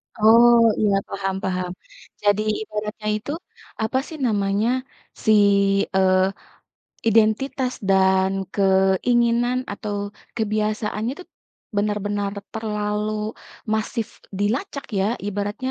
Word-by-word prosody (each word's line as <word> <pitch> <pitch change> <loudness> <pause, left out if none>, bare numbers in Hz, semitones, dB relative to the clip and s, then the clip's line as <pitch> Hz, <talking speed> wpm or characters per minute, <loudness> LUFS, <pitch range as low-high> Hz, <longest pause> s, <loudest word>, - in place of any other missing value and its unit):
Oh, 230 +2 +7 0.3
iya, 205 -2 +3
paham 195 -1 -2
paham. 180 -1 -2 0.5
Jadi 205 0 +3 0.2
ibaratnya 210 0 -5
itu 215 +7 -5 0.5
apa 220 +4 0
sih 320 - -8
namanya, 205 0 +1 0.6
si 220 - +5 0.6
eee, 190 0 +3 0.8
identitas 230 +4 +2 0.2
dan 190 0 +4 0.2
keinginan 230 +6 +3 0.2
atau 205 0 -5 0.4
kebiasaannya 215 +1 -1
tu - - -10 0.5
benar-benar 205 -1 -1 0.2
terlalu 210 -1 -2 0.6
masif 220 +1 -2 0.3
dilacak 270 - -1
ya 190 - +2 0.2
ibaratnya 205 +5 -3
210 Hz, 90 wpm, -22 LUFS, 195-225 Hz, 0.8 s, Oh